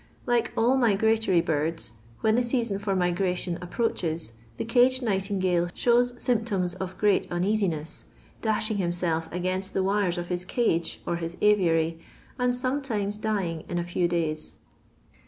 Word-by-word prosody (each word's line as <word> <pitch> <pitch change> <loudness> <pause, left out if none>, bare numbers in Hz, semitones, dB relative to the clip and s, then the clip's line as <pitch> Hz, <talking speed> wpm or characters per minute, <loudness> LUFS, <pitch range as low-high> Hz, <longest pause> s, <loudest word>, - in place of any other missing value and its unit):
Like 240 -2 +1
all 245 +4 +4
migratory 220 -5 +3
birds, 160 +1 -1 0.3
when 220 - +3
the 240 - +3
season 235 -4 0
for 200 -1 -1
mignition 180 -1 0
np|»roaches, 175 - -2 0.3
the - - -3
caged 250 +2 +3
nightingale 190 -4 +1
shows 245 0 +2
symptoms 215 -7 0
of 185 0 -6
great 205 -2 +2
un 175 0 0
easiness, 185 -7 -1 0.4
dashing 215 -1 +1
himself 175 -3 -1
against 185 +2 -2
the 190 - +2
wires 195 -2 +1
of 175 - -3
his 180 0 -1
cage 180 -5 0
or 170 - -1
his 170 +1 -5
aviary, 165 -6 +3 0.4
and 250 0 +2
sometimes 250 -6 -1
dying 200 -7 -2
in 175 - -2
a 175 - 0
few 175 0 0
days. 160 -3 -2
190 Hz, 145 wpm, -27 LUFS, 175-220 Hz, 0.4 s, all